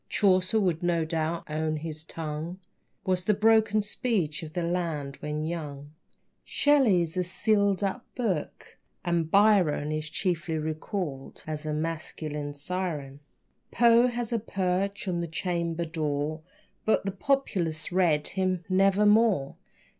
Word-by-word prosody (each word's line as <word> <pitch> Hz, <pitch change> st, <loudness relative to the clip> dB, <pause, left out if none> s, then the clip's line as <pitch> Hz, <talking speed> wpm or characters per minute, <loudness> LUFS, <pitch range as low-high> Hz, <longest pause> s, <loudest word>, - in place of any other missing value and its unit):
Chaucer 185 Hz, +1 st, +3 dB
would 180 Hz, -5 st, 0 dB
no 170 Hz, -2 st, +1 dB
doubt 160 Hz, +1 st, -2 dB
own 155 Hz, 0 st, -1 dB
his 155 Hz, 0 st, -5 dB
tongue 160 Hz, +2 st, -5 dB, 0.5 s
Was 185 Hz, -1 st, +1 dB
the 210 Hz, -, +3 dB
broken 215 Hz, 0 st, +4 dB
speech 200 Hz, -8 st, -1 dB
of 155 Hz, -1 st, -8 dB
the 175 Hz, -, -1 dB
land 165 Hz, -5 st, -2 dB
when 150 Hz, 0 st, -3 dB
young. 150 Hz, -3 st, -5 dB, 0.5 s
Shelley's 205 Hz, -, +3 dB
a 180 Hz, -, +2 dB
sealed 200 Hz, +2 st, +1 dB
up 200 Hz, +5 st, -1 dB
book, 205 Hz, -, -3 dB, 0.3 s
and 170 Hz, -2 st, 0 dB
Byron 190 Hz, -7 st, +4 dB
Is 155 Hz, 0 st, -3 dB
chiefly 165 Hz, -1 st, -1 dB
recalled 155 Hz, -2 st, -4 dB
as 155 Hz, 0 st, -4 dB
a 155 Hz, -, -1 dB
masculine 155 Hz, -2 st, -3 dB
siren. 145 Hz, -4 st, -1 dB, 0.5 s
Poe 235 Hz, +1 st, +5 dB
has 240 Hz, -1 st, -2 dB
a 230 Hz, -, +1 dB
perch 195 Hz, 0 st, -1 dB
on 175 Hz, -2 st, -1 dB
the 170 Hz, -, -3 dB
chamber 170 Hz, 0 st, -2 dB
door, 155 Hz, -1 st, -2 dB, 0.4 s
But 220 Hz, -, +2 dB
the 195 Hz, -, 0 dB
populace 190 Hz, -, -1 dB
read 170 Hz, -5 st, +2 dB
him 185 Hz, -2 st, -1 dB
"Nevermore." 195 Hz, -3 st, +3 dB
175 Hz, 130 wpm, -28 LUFS, 155-200 Hz, 0.5 s, Poe